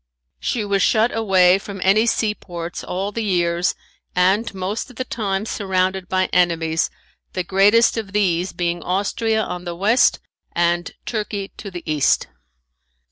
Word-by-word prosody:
She 215 Hz, -, -1 dB
was 200 Hz, -1 st, +1 dB
shut 220 Hz, +4 st, +3 dB
away 190 Hz, -4 st, +4 dB
from 200 Hz, -1 st, -8 dB
any 215 Hz, +4 st, +4 dB
seaports 175 Hz, -7 st, -2 dB
all 195 Hz, +3 st, -3 dB
the 230 Hz, +2 st, -3 dB
years, 175 Hz, -3 st, +1 dB, 0.4 s
and 190 Hz, +5 st, +2 dB
most 195 Hz, +6 st, -4 dB
of 250 Hz, -, -14 dB
the 255 Hz, -, -2 dB
time 205 Hz, -4 st, -2 dB
surrounded 190 Hz, -3 st, -1 dB
by 185 Hz, 0 st, +2 dB
enemies, 165 Hz, -2 st, +2 dB, 0.4 s
the 185 Hz, -, -1 dB
greatest 205 Hz, +6 st, +4 dB
of 215 Hz, -3 st, -4 dB
these 185 Hz, -3 st, +1 dB
being 175 Hz, 0 st, -2 dB
Austria 220 Hz, +4 st, 0 dB
on 180 Hz, -2 st, -5 dB
the 175 Hz, -1 st, -5 dB
west 210 Hz, +8 st, +3 dB, 0.3 s
and 175 Hz, 0 st, +1 dB
Turkey 210 Hz, -3 st, -3 dB
to 205 Hz, -, -7 dB
the 175 Hz, -2 st, -8 dB
east. 150 Hz, -3 st, +2 dB
195 Hz, 145 wpm, -21 LUFS, 180-210 Hz, 0.4 s, away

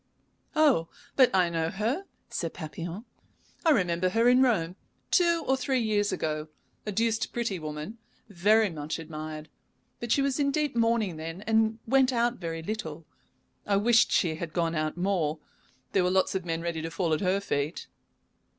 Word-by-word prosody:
"Oh, 285 Hz, -, +4 dB, 0.3 s
but 260 Hz, -2 st, +6 dB
I 185 Hz, -2 st, +3 dB
know 165 Hz, -1 st, -1 dB
her!" 230 Hz, -, -2 dB, 0.2 s
said 165 Hz, -2 st, -4 dB
Papillon. 170 Hz, +7 st, -6 dB, 0.6 s
"I 330 Hz, -, +3 dB
remember 180 Hz, -, +2 dB
her 230 Hz, +5 st, +2 dB
in 250 Hz, +1 st, +6 dB
Rome 185 Hz, -9 st, +2 dB, 0.4 s
two 340 Hz, -2 st, +3 dB
or 265 Hz, -, +3 dB
three 265 Hz, 0 st, 0 dB
years 210 Hz, -3 st, +1 dB
ago. 155 Hz, 0 st, -2 dB, 0.4 s
A -, -, -1 dB
deuced 225 Hz, +2 st, 0 dB
pretty 230 Hz, -6 st, -2 dB
woman, 155 Hz, +8 st, -6 dB, 0.3 s
very 210 Hz, +2 st, +3 dB
much 155 Hz, -1 st, -4 dB
admired, 155 Hz, -1 st, -7 dB, 0.5 s
but 240 Hz, -1 st, -4 dB
she 275 Hz, -, +3 dB
was 275 Hz, 0 st, 0 dB
in 280 Hz, -1 st, +2 dB
deep 295 Hz, -2 st, -1 dB
mourning 230 Hz, -6 st, +1 dB
then, 165 Hz, +5 st, -6 dB
and 220 Hz, 0 st, +2 dB
went 265 Hz, +2 st, +4 dB
out 240 Hz, 0 st, +1 dB
very 165 Hz, -2 st, -4 dB
little. 165 Hz, -6 st, -5 dB, 0.6 s
I 200 Hz, -1 st, +3 dB
wished 225 Hz, +2 st, +4 dB
she 170 Hz, -4 st, +2 dB
had 165 Hz, -1 st, -6 dB
gone 170 Hz, -2 st, 0 dB
out 155 Hz, 0 st, -2 dB
more. 175 Hz, -5 st, 0 dB, 0.5 s
There 190 Hz, -, +3 dB
were 180 Hz, -, +2 dB
lots 190 Hz, 0 st, +2 dB
of 190 Hz, -2 st, -3 dB
men 165 Hz, -1 st, -2 dB
ready 170 Hz, -2 st, -2 dB
to 165 Hz, -, -4 dB
fall 165 Hz, +1 st, -1 dB
at 155 Hz, -, 0 dB
her 190 Hz, 0 st, +2 dB
feet." 150 Hz, -5 st, -2 dB
190 Hz, 175 wpm, -28 LUFS, 165-230 Hz, 0.6 s, but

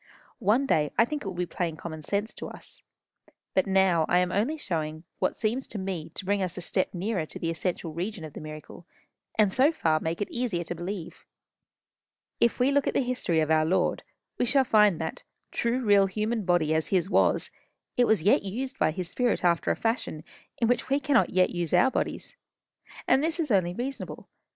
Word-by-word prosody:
One 225 Hz, +8 st, +3 dB
day 150 Hz, -, +2 dB
I 230 Hz, -, +6 dB
think 295 Hz, +3 st, -4 dB
it -, -, -6 dB
will 190 Hz, -, -4 dB
be 180 Hz, 0 st, -1 dB
plain 170 Hz, -2 st, -3 dB
common 160 Hz, 0 st, -7 dB
sense 205 Hz, +7 st, -2 dB
to -, -, -7 dB
us. -, -, -10 dB, 0.7 s
But 190 Hz, -, +2 dB
now 190 Hz, -4 st, +3 dB
I 175 Hz, -, +4 dB
am 180 Hz, 0 st, +2 dB
only 235 Hz, +12 st, 0 dB
showing 160 Hz, -, -3 dB
you 160 Hz, -, -14 dB, 0.2 s
what -, -, 0 dB
seems 235 Hz, +5 st, -1 dB
to -, -, -6 dB
me 190 Hz, -5 st, -4 dB
to 190 Hz, -, -5 dB
bring 200 Hz, +1 st, +1 dB
us 185 Hz, 0 st, -3 dB
a -, -, -4 dB
step 185 Hz, +2 st, 0 dB
nearer 180 Hz, -3 st, -2 dB
to -, -, -9 dB
the 165 Hz, -, -2 dB
essential 165 Hz, -1 st, -3 dB
region 180 Hz, +2 st, -4 dB
of 155 Hz, -, -10 dB
the -, -, -8 dB
miracle, 155 Hz, +3 st, -10 dB, 0.5 s
and 210 Hz, -3 st, +4 dB
so 275 Hz, +5 st, +4 dB
far 160 Hz, -, +1 dB
make 165 Hz, +1 st, -3 dB
it 205 Hz, -, -3 dB
easier 230 Hz, -8 st, -1 dB
to 170 Hz, -, -5 dB
believe. 175 Hz, +1 st, -6 dB, 1.2 s
If 235 Hz, -, +2 dB
we 255 Hz, +3 st, +3 dB
look 285 Hz, 0 st, +2 dB
at -, -, -1 dB
the -, -, +3 dB
history 245 Hz, -10 st, 0 dB
of 155 Hz, 0 st, 0 dB
our 155 Hz, 0 st, +4 dB
Lord, 170 Hz, +4 st, +1 dB, 0.4 s
we -, -, +3 dB
shall 275 Hz, +2 st, +4 dB
find 210 Hz, -7 st, +4 dB
that, 160 Hz, -1 st, -4 dB, 0.3 s
true 240 Hz, +2 st, 0 dB
real 200 Hz, -2 st, +5 dB
human 215 Hz, +2 st, -2 dB
body 175 Hz, -3 st, +2 dB
as 160 Hz, 0 st, +1 dB
his 185 Hz, -2 st, +1 dB
was, -, -, +2 dB, 0.4 s
it 245 Hz, -1 st, +3 dB
was 220 Hz, -7 st, +3 dB
yet 205 Hz, -, +4 dB
used 255 Hz, +7 st, -5 dB
by -, -, +3 dB
his 175 Hz, +3 st, -3 dB
spirit 240 Hz, +1 st, 0 dB
after 170 Hz, -1 st, +2 dB
a -, -, +2 dB
fashion 225 Hz, -9 st, -2 dB, 0.3 s
in 230 Hz, -, +1 dB
which 245 Hz, +2 st, 0 dB
we 275 Hz, +1 st, +3 dB
cannot 280 Hz, -3 st, +3 dB
yet 185 Hz, 0 st, +3 dB
use 175 Hz, -3 st, -1 dB
our 265 Hz, -, +5 dB
bodies. -, -, -3 dB, 0.7 s
And 270 Hz, -, +4 dB
this 325 Hz, +2 st, -1 dB
is 305 Hz, -6 st, -1 dB
only 180 Hz, -3 st, +2 dB
reasonable. 265 Hz, +4 st, -5 dB
190 Hz, 215 wpm, -27 LUFS, 170-235 Hz, 1.2 s, I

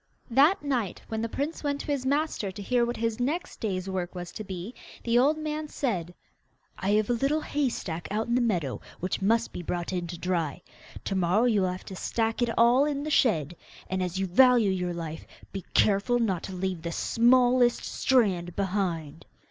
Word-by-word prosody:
That 295 Hz, +10 st, +4 dB
night, 250 Hz, -9 st, -1 dB
when 220 Hz, 0 st, -2 dB
the 230 Hz, -, -2 dB
prince 290 Hz, +8 st, -3 dB
went 285 Hz, -1 st, -1 dB
to -, -, -8 dB
his 280 Hz, -3 st, -1 dB
master 285 Hz, -7 st, 0 dB
to 195 Hz, -, -8 dB
hear 245 Hz, +3 st, +2 dB
what 240 Hz, -, -3 dB
his 230 Hz, 0 st, -1 dB
next 295 Hz, +8 st, -2 dB
day's 190 Hz, -4 st, -2 dB
work 185 Hz, -1 st, -3 dB
was 175 Hz, -1 st, -6 dB
to 215 Hz, -, -6 dB
be, 190 Hz, +3 st, -6 dB, 0.3 s
the 235 Hz, 0 st, +3 dB
old 290 Hz, +5 st, +3 dB
man 310 Hz, 0 st, -3 dB
said: 190 Hz, -, -2 dB, 0.7 s
'I 190 Hz, -, -1 dB
have 215 Hz, +1 st, +2 dB
a -, -, +3 dB
little 275 Hz, +6 st, +1 dB
hay 290 Hz, -3 st, 0 dB
stack 170 Hz, -7 st, -5 dB
out 215 Hz, +2 st, -1 dB
in 235 Hz, -, -2 dB
the 250 Hz, -, +3 dB
meadow 175 Hz, -, -1 dB, 0.2 s
which 185 Hz, +2 st, -2 dB
must 225 Hz, +4 st, +1 dB
be -, -, -5 dB
brought 175 Hz, +1 st, -3 dB
in 175 Hz, -1 st, -2 dB
to 175 Hz, 0 st, -6 dB
dry. 170 Hz, -4 st, -1 dB, 0.5 s
To -, -, -2 dB
morrow 190 Hz, +4 st, +2 dB
you 220 Hz, -5 st, +3 dB
will 185 Hz, -1 st, +1 dB
have 185 Hz, -, -8 dB
to 190 Hz, -, -8 dB
stack 225 Hz, +4 st, -1 dB
it 240 Hz, -, +2 dB
all 240 Hz, +4 st, +5 dB
in 285 Hz, -1 st, -2 dB
the 305 Hz, -, -3 dB
shed, 175 Hz, -, +2 dB, 0.4 s
and, 190 Hz, 0 st, 0 dB
as 180 Hz, 0 st, -2 dB
you 195 Hz, -, 0 dB
value 235 Hz, +2 st, +5 dB
your 180 Hz, -1 st, -1 dB
life, 160 Hz, -2 st, -6 dB, 0.3 s
be 195 Hz, -2 st, -5 dB
careful 205 Hz, +4 st, +3 dB
not 195 Hz, -8 st, 0 dB
to -, -, -7 dB
leave 185 Hz, -2 st, -2 dB
the 170 Hz, +1 st, -4 dB
smallest 245 Hz, +4 st, +3 dB
strand 190 Hz, -9 st, +1 dB
behind. 180 Hz, -6 st, -2 dB
215 Hz, 205 wpm, -27 LUFS, 180-250 Hz, 0.7 s, all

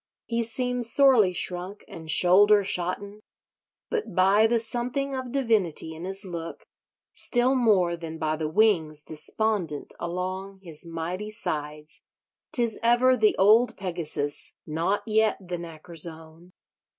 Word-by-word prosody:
He 235 Hz, 0 st, -1 dB
seems 245 Hz, 0 st, +1 dB
sorely 255 Hz, -9 st, +5 dB
shrunk 180 Hz, +3 st, -4 dB
and 160 Hz, -1 st, -10 dB
shoulder 200 Hz, +5 st, +5 dB
shotten; 195 Hz, +3 st, -3 dB, 0.7 s
but 435 Hz, -, -3 dB
by 195 Hz, +4 st, +4 dB
the 235 Hz, +1 st, +2 dB
something 245 Hz, +5 st, -2 dB
of 260 Hz, -2 st, -5 dB
divinity 220 Hz, -, 0 dB
in 160 Hz, +2 st, -8 dB
his 195 Hz, +2 st, -3 dB
look, 170 Hz, -2 st, -7 dB, 0.5 s
still 245 Hz, +2 st, +3 dB
more 205 Hz, -9 st, +2 dB
than 165 Hz, -1 st, -8 dB
by 155 Hz, -1 st, -1 dB
the 155 Hz, 0 st, -3 dB
wings 160 Hz, -6 st, +1 dB
despondent 165 Hz, 0 st, -2 dB
along 185 Hz, +3 st, -5 dB
his 165 Hz, -1 st, -4 dB
mighty 170 Hz, +5 st, -5 dB
sides, 150 Hz, -7 st, -4 dB, 0.5 s
'tis 235 Hz, -3 st, +1 dB
ever 240 Hz, +2 st, +4 dB
the 220 Hz, -3 st, +2 dB
old 220 Hz, +5 st, +4 dB
Pegasus—not 170 Hz, 0 st, -2 dB
yet 220 Hz, 0 st, +2 dB
the 180 Hz, -2 st, -6 dB
knacker's 165 Hz, 0 st, -7 dB
own. 165 Hz, +2 st, -13 dB
190 Hz, 125 wpm, -26 LUFS, 165-225 Hz, 0.7 s, sorely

